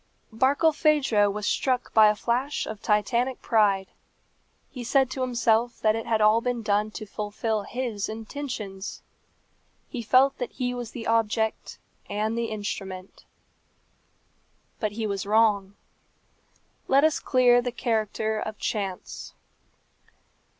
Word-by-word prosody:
Barkilphedro 280 -4 +3
was 210 +1 -4
struck 255 +2 0
by 215 -1 +7
a 210 - +3
flash 245 +6 -1
of 215 -2 -7
Titanic 235 +5 +1
pride. 200 -4 +3 0.9
He 250 - -7
said 265 +1 +2
to 260 - -4
himself 240 -1 +1
that 215 0 +3
it 225 - -4
had 220 -1 +1
all 215 +2 +5
been 245 -1 -2
done 210 0 +1
to 215 - -7
fulfil 210 +1 -3
his 235 -3 -4
intentions. 220 -4 -6 0.9
He 250 - -5
felt 260 +4 +3
that 245 - -4
he 250 -1 -2
was 245 -2 -5
the 230 -1 -8
object 220 -1 0 0.3
and 215 +2 -1
the 235 0 -1
instrument. 195 -3 -6 1.5
But 215 -2 -2
he 220 +1 -3
was 200 -1 -3
wrong. 205 -2 +2 1.1
Let 275 +2 +4
us 315 -1 +3
clear 245 -2 +4
the 245 0 -3
character 220 -2 -1
of 215 0 -5
chance. 195 -4 -4
225 Hz, 130 wpm, -26 LUFS, 210-245 Hz, 1.5 s, by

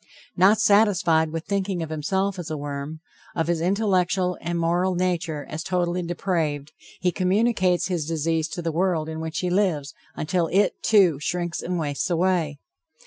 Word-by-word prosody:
Not 195 +4 +5
satisfied 185 -7 +3
with 165 +1 -4
thinking 195 -3 -1
of 160 - -7
himself 190 +5 -1
as 175 -1 -5
a 155 - -3
worm, 145 +2 -5 0.3
of 165 - 0
his 170 -1 0
intellectual 185 -1 +1
and 170 0 -2
moral 175 +2 +1
nature 170 -4 -1
as 155 - -5
totally 180 0 -1
depraved, 165 -5 -2 0.3
he 180 - +2
communicates 185 -1 +2
his 170 -5 -2
disease 160 0 0
to 175 - -6
the 165 - -1
world 165 -2 0
in 160 0 -5
which 160 0 -4
he 180 -1 -1
lives 175 -7 0 0.2
until 170 +2 0
it, 200 +5 +2
too, 185 -9 +4
shrinks 175 +2 -2
and 180 0 -2
wastes 145 -1 -2
away. 170 -4 +1
175 Hz, 165 wpm, -24 LUFS, 160-185 Hz, 0.3 s, Not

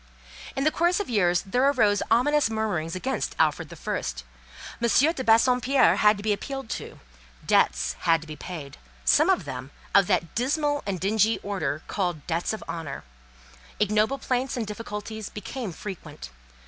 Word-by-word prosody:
In 270 - -1
the 310 - +3
course 345 +4 +2
of 410 - -4
years 180 -5 +2
there 245 +6 0
arose 210 -7 +3
ominous 290 +4 +3
murmurings 205 -7 -2
against 185 - -2
Alfred - - +1
the - - -9
First; - - -4 0.6
M. 235 - +2
de 285 +3 +3
Bassompierre 250 +3 +4
had 210 0 +5
to 205 - -8
be 215 -1 +2
appealed 270 +4 -5
to, - - -6 0.5
debts - - +2
had 165 -1 +3
to 160 - -11
be 155 - -7
paid, 150 -5 -8 0.3
some - - +5
of - - +2
them 130 +1 -6 0.2
of 200 -2 +5
that 175 -4 0
dismal 290 +4 0
and 190 -3 -2
dingy 215 +3 +2
order 155 -7 -2
called 175 -7 -2
"debts 170 +1 -1
of 220 - -5
honour;" 155 -5 -5 0.8
ignoble 215 +5 +2
plaints 255 -1 -1
and 230 - -1
difficulties 210 0 -6
became 215 +1 -6
frequent. 160 - -8
210 Hz, 160 wpm, -26 LUFS, 175-250 Hz, 0.8 s, had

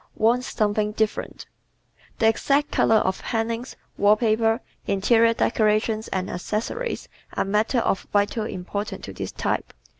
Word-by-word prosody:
Wants 240 +3 +2
"Something 210 0 0
Different" 220 -1 -2 0.7
¶ - - -35
The 225 - +3
exact 280 +6 +2
color 225 - +3
of 190 -3 +1
hangings, 230 +2 -2 0.2
wall 205 +1 +5
paper, 225 +1 +2 0.3
interior 230 +4 +3
decorations 215 0 +1
and 185 0 -2
accessories 220 - -3 0.3
are - - 0
matters 215 +4 +1
of 195 - -1
vital 205 +2 +1
import 200 +1 -4
to - - -8
this - - -5
type. - - -2
220 Hz, 140 wpm, -24 LUFS, 210-230 Hz, 0.7 s, wall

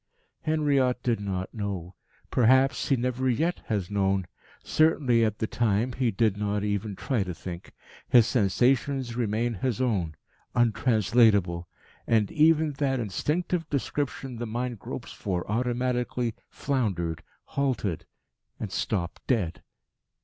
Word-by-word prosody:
Henriot 140 -5 +1
did 120 -3 +1
not 95 -2 -3
know. 100 -5 -4 0.4
Perhaps 130 +3 +3
he 135 - +5
never 125 +1 0
yet 160 +9 0
has 100 -4 -2
known. 95 -2 +1 0.4
Certainly, 140 -7 +3
at 110 -1 0
the - - -1
time, 115 +2 0
he 125 -1 +1
did 110 -1 +1
not 105 0 -1
even 105 0 -2
try 120 +3 -1
to 90 -3 -3
think. 85 +1 -8 0.4
His 120 -3 +7
sensations 125 +3 +1
remain 115 0 0
his 120 +3 -2
own 95 -11 0 0.4
untranslatable; 110 -6 +3 0.4
and 110 -3 +2
even 155 0 +4
that 135 -3 +1
instinctive 160 - -1
description 135 -2 -2
the 120 0 -4
mind 120 0 -3
gropes - - -7
for 90 -3 -3
automatically, 125 +1 -1 0.2
floundered, 95 - -1 0.2
halted, 130 - -2 0.5
and - - -4
stopped 90 -5 -2
dead. 95 - 0
115 Hz, 125 wpm, -27 LUFS, 100-130 Hz, 0.5 s, His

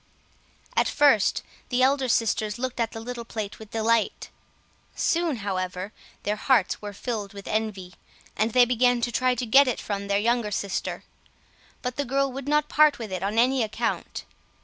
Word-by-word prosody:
At - - +3
first 275 -9 +3 0.3
the 255 0 +2
elder 265 -1 +2
sisters 220 -2 +1
looked 255 0 -4
at 230 -1 0
the 225 - -7
little 240 +1 -6
plate 215 -3 -6
with 220 -1 -11
delight; 225 0 0 0.6
soon, 335 -3 +1
however, 185 0 -3 0.3
their 210 +1 -1
hearts 235 -4 +2
were 205 -1 -6
filled 205 -1 -5
with 200 -1 -10
envy, 210 -4 -3 0.4
and 220 +2 +1
they 250 -1 +7
began 245 0 +2
to 240 - -1
try 255 +2 +1
to 245 - -3
get 270 +5 +6
it 250 - -1
from 200 -1 -4
their 200 0 +2
younger 235 +1 +1
sister. 200 -1 -3 0.8
But 250 -1 -3
the 285 - -1
girl 275 +2 0
would 270 +1 -7
not 300 0 +2
part 305 -1 +4
with 225 -4 -7
it 185 -1 -3
on 200 +3 -2
any 255 +2 +3
account. 220 -1 -3
230 Hz, 175 wpm, -25 LUFS, 210-255 Hz, 0.8 s, they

